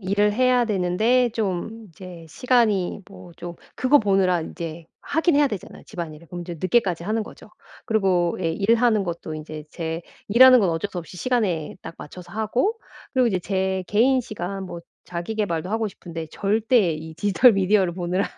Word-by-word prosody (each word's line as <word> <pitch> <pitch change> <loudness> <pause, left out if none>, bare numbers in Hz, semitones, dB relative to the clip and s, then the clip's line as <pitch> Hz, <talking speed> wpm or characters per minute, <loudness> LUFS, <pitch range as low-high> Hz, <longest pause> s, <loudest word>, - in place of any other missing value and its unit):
일을 205 +2 +1
해야 250 +2 +3
되는데 220 +5 +2
좀 220 +1 -3
이제 175 0 -11
시간이 215 - +1
뭐 180 -3 -13
좀 175 0 -7 0.2
그거 270 +3 +4
보느라 195 -5 +2
이제 165 0 -7 0.2
하기는 320 -1 +1
해야 290 - +5
되잖아요 205 -7 -8
집안일을. 170 -4 -8
그럼 175 -1 -6
이제 175 0 -6
늦게까지 185 -4 +1
하는 220 +4 -1
거죠. 210 - -14 0.4
그리고 190 -5 +1
일하는 215 +6 +2
것도 170 -3 -5
인제 155 0 -8
제 165 0 -4 0.3
일하는 255 +3 +8
건 190 -4 +2
어쩔 165 +5 -2
수 180 - -5
없이 175 +1 -9
시간에 190 -7 -1
딱 165 - -8
맞춰서 175 +4 -11
하고 240 - 0 0.3
그리고 255 -2 +3
이제 195 -5 +1
제 190 0 -1
개인 255 +5 +3
시간 195 -4 -5
뭐 175 -2 -7 0.2
자기 175 +5 -5
계발도 185 -5 -2
하고 220 0 0
싶은데 165 -4 -8
절대 215 -1 +2
이 160 +1 -7
디지털 205 +8 +4
미디어를 195 -2 +2
보느라 180 +2 -1
195 Hz, 360 characters per minute, -23 LUFS, 175-225 Hz, 0.4 s, 일하는